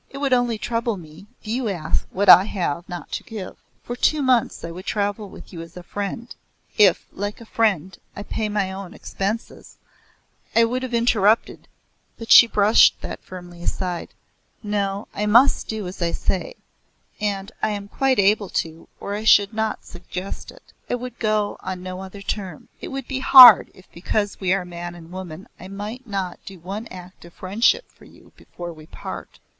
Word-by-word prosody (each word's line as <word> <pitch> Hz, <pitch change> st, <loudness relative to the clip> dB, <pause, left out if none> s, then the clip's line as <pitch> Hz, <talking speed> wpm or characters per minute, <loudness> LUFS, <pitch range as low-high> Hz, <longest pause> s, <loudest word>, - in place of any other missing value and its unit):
It 275 Hz, -, -10 dB
would 275 Hz, -2 st, 0 dB
only 245 Hz, -2 st, +1 dB
trouble 230 Hz, -1 st, -2 dB
me 160 Hz, +3 st, -13 dB
if -, -, -17 dB
you 235 Hz, +1 st, -1 dB
asked 165 Hz, -5 st, -2 dB
what 200 Hz, +2 st, -1 dB
I 185 Hz, -, +10 dB
have 175 Hz, -4 st, -3 dB
not 175 Hz, -1 st, -7 dB
to -, -, -4 dB
give. 210 Hz, -5 st, -8 dB, 0.3 s
For 240 Hz, -, -5 dB
two 295 Hz, +4 st, +1 dB
months 255 Hz, -3 st, +1 dB
I 165 Hz, -, -6 dB
would 180 Hz, +3 st, -10 dB
travel 205 Hz, 0 st, -2 dB
with -, -, -13 dB
you 165 Hz, -, -7 dB
as 165 Hz, +1 st, -12 dB
a 180 Hz, -, -9 dB
friend, 205 Hz, +6 st, -5 dB, 0.4 s
if, 195 Hz, -4 st, +4 dB
like 205 Hz, +1 st, -5 dB
a 230 Hz, -, -12 dB
friend, 190 Hz, -6 st, 0 dB, 0.2 s
I 205 Hz, -, -6 dB
paid 215 Hz, 0 st, -3 dB
my 205 Hz, -2 st, -1 dB
own 190 Hz, -1 st, -8 dB
expenses 205 Hz, +4 st, -5 dB, 0.4 s
" -, -, -36 dB
I 230 Hz, -, +6 dB
would 245 Hz, +3 st, 0 dB
have 255 Hz, -2 st, -3 dB
interrupted, 225 Hz, -2 st, +2 dB, 0.5 s
but 230 Hz, -, -7 dB
she 235 Hz, -, +10 dB
brushed 210 Hz, 0 st, +4 dB
that -, -, -7 dB
firmly 175 Hz, -2 st, -11 dB
aside. 180 Hz, -1 st, -4 dB, 0.5 s
"No, 200 Hz, 0 st, -2 dB
I 210 Hz, -, -2 dB
must 240 Hz, +6 st, +4 dB
do 220 Hz, -2 st, -4 dB
as 180 Hz, +1 st, -9 dB
I 170 Hz, -1 st, 0 dB
say, -, -, -2 dB, 0.6 s
and 200 Hz, -2 st, -3 dB
I -, -, +1 dB
am 205 Hz, -1 st, -4 dB
quite 265 Hz, +4 st, +1 dB
able 200 Hz, 0 st, +3 dB
to 160 Hz, 0 st, -4 dB
or 200 Hz, -, -5 dB
I 210 Hz, +1 st, -4 dB
should 205 Hz, -1 st, +5 dB
not 220 Hz, 0 st, -2 dB
suggest 180 Hz, +2 st, -8 dB
it. -, -, -16 dB, 0.2 s
I -, -, +1 dB
would 245 Hz, 0 st, -8 dB
go 215 Hz, -2 st, 0 dB
on 185 Hz, -1 st, -6 dB
no 185 Hz, 0 st, -6 dB
other 190 Hz, +1 st, -10 dB
terms. 190 Hz, -6 st, -5 dB
It -, -, -6 dB
would 270 Hz, -2 st, -6 dB
be 265 Hz, -, -3 dB
hard 255 Hz, -4 st, +10 dB
if 185 Hz, -, -17 dB
because 205 Hz, +4 st, -2 dB
we 185 Hz, -2 st, 0 dB
are 190 Hz, -1 st, +1 dB
man 175 Hz, 0 st, -7 dB
and 165 Hz, -1 st, -13 dB
woman 185 Hz, -1 st, -8 dB
I 185 Hz, -, -10 dB
might 210 Hz, +6 st, -7 dB
not 195 Hz, -4 st, -4 dB
do 195 Hz, -, -10 dB
one 195 Hz, +7 st, -6 dB
act 180 Hz, 0 st, -12 dB
of 170 Hz, -1 st, -15 dB
friendship 215 Hz, -, +1 dB
for -, -, -20 dB
you -, -, -19 dB
before 175 Hz, -1 st, -9 dB
we 155 Hz, -1 st, -15 dB
part. -, -, -9 dB
200 Hz, 195 wpm, -22 LUFS, 185-225 Hz, 0.6 s, I